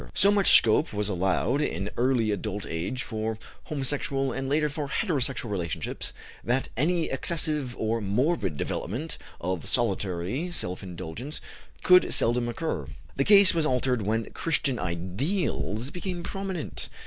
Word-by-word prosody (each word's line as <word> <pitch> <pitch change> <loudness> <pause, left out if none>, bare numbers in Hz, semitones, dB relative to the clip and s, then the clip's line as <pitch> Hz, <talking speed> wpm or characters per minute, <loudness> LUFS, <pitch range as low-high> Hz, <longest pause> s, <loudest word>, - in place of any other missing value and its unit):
So 200 - +6
much 200 -2 +7
scope 115 +6 +2
was 105 0 -1
allowed 95 +8 +1
in 100 -8 -2
early 120 -3 +2
adult 105 -1 -3
age 85 +11 -3
for 110 -1 -3 0.3
homosexual 135 -1 -1
and 135 0 -3
later 150 +2 +2
for 145 0 -4
heterosexual 135 - -1
relationships 85 -5 -3 0.3
that 125 +3 0
any 165 +6 +1
excessive 150 -6 0
or 110 +1 0
morbid 105 - 0
development 125 - -3 0.2
of 90 -2 -3
solitary 100 - 0
self 90 - -2
indulgence 95 - -6 0.4
could 180 0 +6
seldom 120 +1 +2
occur. 160 +7 -3 0.3
The 135 - +2
case 200 -2 +8
was 165 -2 +1
altered 125 -2 +1
when 110 +2 -1
Christian 140 -6 0
ideals 105 - -2
became 180 -1 -4
prominent. 190 -4 -4
125 Hz, 135 wpm, -27 LUFS, 105-155 Hz, 0.4 s, case